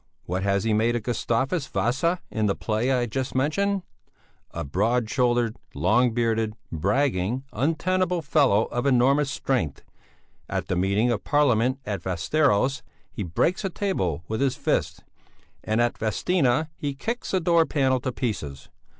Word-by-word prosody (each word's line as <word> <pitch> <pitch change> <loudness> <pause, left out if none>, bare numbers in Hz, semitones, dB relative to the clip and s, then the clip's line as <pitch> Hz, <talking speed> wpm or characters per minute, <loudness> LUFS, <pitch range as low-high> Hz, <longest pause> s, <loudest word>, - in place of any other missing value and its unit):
What 90 +2 -3
has 100 0 +1
he 110 - +1
made 115 +3 +2
of 120 - -2
Gustavus 130 +6 -1
Vasa 165 +9 0
in 110 -1 0
the 100 - +1
play 115 +4 -1
I 125 -2 +2
just 130 +3 -4
mentioned? 195 +8 +1 0.7
A - - -5
broad 110 - 0
shouldered, 120 -2 +1 0.2
long 110 - +3
bearded, 115 -2 0 0.2
bragging, 105 - 0
untenable 175 - 0
fellow 140 -8 +3
of 120 +3 -1
enormous 135 +2 +3
strength; 125 - -2 0.7
at - - -3
the 95 - +1
meeting 100 +6 +2
of 110 - -2
Parliament 130 -4 +2
at 100 -2 -3
Västeros, 130 - +1 0.3
he - - -6
breaks 105 - 0
a 195 - 0
table 95 - -2
with 110 +3 -2
his 135 -2 +1
fist, - - -1 0.6
and 110 +1 0
at 120 0 +1
Vadstena 135 - +1
he 145 -4 -4
kicks 230 - -4
a 190 - +2
door 170 -1 +3
panel 130 -3 +1
to 130 - -3
pieces. 75 - -4
125 Hz, 150 wpm, -25 LUFS, 110-145 Hz, 0.7 s, long